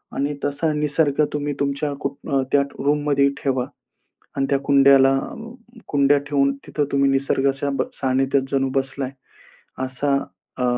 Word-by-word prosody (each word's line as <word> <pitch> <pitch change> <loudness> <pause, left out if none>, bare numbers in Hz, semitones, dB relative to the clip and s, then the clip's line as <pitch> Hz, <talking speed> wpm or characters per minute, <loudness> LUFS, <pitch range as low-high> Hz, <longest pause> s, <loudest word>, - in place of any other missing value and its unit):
आणि 145 +1 -1
तसा 145 +3 0
निसर्ग 150 0 +1
तुम्ही 145 0 -2
तुमच्या 140 +1 -1
को 140 0 -3
अ, 135 -1 +2
त्या 140 - +4 0.2
रूममध्ये 145 -1 +2
ठेवा. 130 -3 0 0.7
आणि 135 - +1
त्या 140 - +2
कुंड्याला 135 -1 +5
अ, - - -7 0.5
कुंड्या 145 0 +3
ठेवून 140 -1 +2
तिथं 150 - -1
तुम्ही 140 0 +3
निसर्गाच्या 135 +1 0
ब - - 0
सानिध्यात 135 0 +1
जणू 135 -1 +1
बसलाय 135 0 -2 0.7
असा 140 +2 0 0.4
अ, 125 - 0
140 Hz, 140 wpm, -22 LUFS, 135-145 Hz, 0.7 s, कुंड्याला